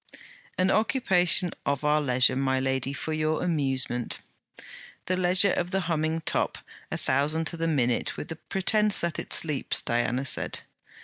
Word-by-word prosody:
'An 185 +1 +2
occupation 185 -6 +2
of 140 +1 -2
our 150 +1 +3
leisure, 130 -2 +3
my 130 0 0
lady, 130 0 -1
for 150 +3 -4
your 155 +1 -1
amusement.' 135 -7 0 0.9
'The 185 - 0
leisure 185 +2 +4
of 175 - -2
the 195 +1 -1
humming 160 -1 -1
top, - - -1 0.3
a - - -2
thousand 150 +5 0
to 170 - 0
the 165 0 -2
minute, 125 -6 0
with - - -7
the 160 - -5
pretence 210 +4 +1
that 170 -2 -2
it - - -8
sleeps!' 150 -4 +2
Diana 120 +3 -1
said. - - 0
155 Hz, 160 wpm, -26 LUFS, 135-180 Hz, 0.9 s, leisure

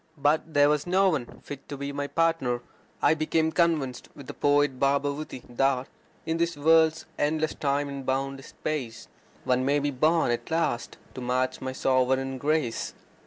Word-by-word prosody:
But 150 +2 +1
there 145 0 +6
was 150 +2 +1
no 190 +2 +4
one 140 -9 -1 0.2
fit 140 -1 -9
to 145 - -5
be 140 +1 -4
my 140 0 -3
partner. 165 -7 +1 0.4
I - - +6
became 160 +1 +1
convinced, 160 -7 0
with 140 - -11
the - - -7
poet 145 -2 +2
Bhabavuti, 140 0 -1
that 130 +1 +1 0.4
In 160 0 -1
this 170 -1 0
worlds 160 +1 +4
endless 155 +1 +1
time 145 0 0
and 140 -1 -6
boundless 135 +1 -2
space 125 -7 -5 0.4
One 125 0 +1
may 140 +2 +2
be 145 0 0
born 155 +2 +2
at 120 - -3
last 160 -8 -1 0.2
to 130 - -7
match 125 +1 -1
my 130 0 -4
sovereign 130 0 +1
grace. 145 -4 -1
145 Hz, 165 wpm, -27 LUFS, 130-155 Hz, 0.4 s, there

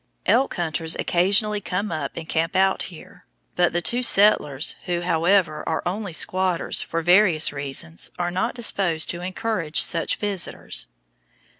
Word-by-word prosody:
Elk 270 - +2
hunters 165 -1 0
occasionally 200 +4 +1
come 195 +2 -3
up 155 - -4
and 165 -1 -6
camp 165 +3 -1
out 190 0 +2
here; 180 +2 -15 0.3
but 175 -1 +2
the 175 0 -2
two 245 +1 +2
settlers, 185 - +3
who, 175 -1 -2
however, 170 -1 +1
are 160 - -2
only 195 +2 -3
squatters, 185 +1 +1
for 165 0 -3
various 175 -4 +4
reasons 135 - -4
are 175 0 -2
not 190 +8 -2
disposed 190 -9 0
to 175 - -7
encourage 185 -3 -2
such 165 -2 +1
visitors. 200 - -3
175 Hz, 145 wpm, -23 LUFS, 165-195 Hz, 0.3 s, various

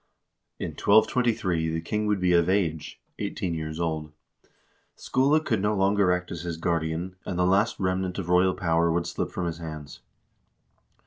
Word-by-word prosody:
In - - -4
1223 110 -6 +2
the 80 0 -2
king 105 +6 -2
would 105 -2 +1
be 90 -1 +2
of 85 0 +3
age 85 -6 -1 0.2
(eighteen 90 -3 -3
years 80 0 -4
old); 80 -2 -2 0.8
Skule 140 +4 +2
could 110 -10 -1
no 105 +1 +1
longer 100 -1 +3
act 90 0 -2
as - - -5
his 85 -2 -4
guardian, 85 +2 -2
and 90 - -4
the 90 - +2
last 100 +5 +2
remnant 95 -1 -1
of 95 -4 -4
royal 90 +1 +3
power 85 -1 +1
would 85 +1 0
slip 85 - -3
from 90 - -4
his 85 0 -4
hands. 75 -3 -8
90 Hz, 170 wpm, -26 LUFS, 80-100 Hz, 0.8 s, of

